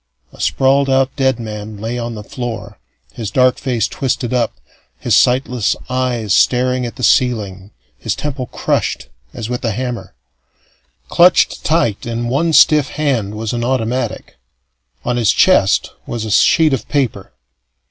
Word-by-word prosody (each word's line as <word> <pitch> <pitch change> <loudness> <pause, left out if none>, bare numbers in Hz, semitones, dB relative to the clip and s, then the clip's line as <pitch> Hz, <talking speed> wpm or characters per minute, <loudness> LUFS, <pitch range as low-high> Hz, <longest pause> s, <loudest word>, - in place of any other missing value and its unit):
A - - -11
sprawled 135 +1 +2
out 135 0 +1
dead 130 -3 +1
man 105 -1 -7
lay 115 +4 -4
on 120 -1 -4
the 105 - -8
floor, 120 - -6 0.3
his 110 -4 -5
dark 125 +3 +2
face 120 -5 -1
twisted 130 -2 -2
up, 120 -3 0 0.4
his - - +1
sightless 125 -3 +2 0.2
eyes 125 -5 -1
staring 125 0 +2
at 120 - -9
the 130 - -8
ceiling, 100 -8 +1 0.3
his - - -2
temple 140 -4 -4
crushed - - -2 0.2
as 115 - -6
with 125 0 -4
a 115 - 0
hammer. 125 +1 -5 0.9
Clutched 175 +1 +4
tight 150 -11 0
in 120 0 -3
one 155 +6 +1
stiff 150 -2 +5
hand 125 -9 -1
was 110 +1 -4
an 120 0 -2
automatic. 125 - -2 0.7
On 125 0 0
his 115 -3 +3
chest - - +3 0.2
was 115 -2 -4
a 110 - -4
sheet 155 +7 +4
of 135 - -3
paper. 135 - -2
125 Hz, 150 wpm, -17 LUFS, 115-130 Hz, 0.9 s, stiff